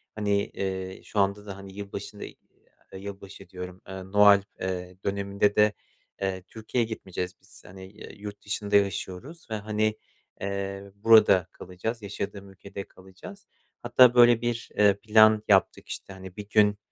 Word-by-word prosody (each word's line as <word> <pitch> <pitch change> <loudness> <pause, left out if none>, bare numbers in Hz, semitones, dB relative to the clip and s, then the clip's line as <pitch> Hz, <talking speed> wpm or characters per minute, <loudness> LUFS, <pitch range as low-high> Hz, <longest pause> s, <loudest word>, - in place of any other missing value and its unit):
Hani, 105 -1 -1
eee, 95 -1 -5
şu 105 - -3
anda 100 +1 +1
da 100 -2 -7
hani 100 0 -11
yılbaşında, 100 +1 -7
eee, - - -10 0.6
yılbaşı 100 -1 -10
diyorum, 90 0 -8
eee, 95 0 -7
Noel, 100 +1 +6 0.2
eee, 90 -1 -4
döneminde 100 +1 0
de, 105 0 +4 0.5
eee, 95 -1 -2
Türkiye'ye 115 +2 -2
gitmeyeceğiz 90 -4 -5
biz. - - -15
Hani 95 +2 -12
ya - - -9
yurt 105 0 -9
dışında 105 0 -2
yaşıyoruz 100 - -1
ve - - 0
hani, 110 0 -1 0.5
eee, 100 0 -4
burada 100 -4 +5
kalacağız, 110 +6 -6
yaşadığım 100 -1 -6
ülkede 100 +1 -9
kalacağız. 95 - -14 0.4
Hatta 125 -2 +6
böyle 120 -2 +6
1 120 -1 -3
eee, 105 -1 +6
plan 110 0 +5
yaptık. 95 -2 +2
İşte 95 - -6
hani 95 -1 -11
1 105 -1 -8
gün, 105 -1 +4
100 Hz, 150 wpm, -27 LUFS, 95-105 Hz, 0.6 s, Noel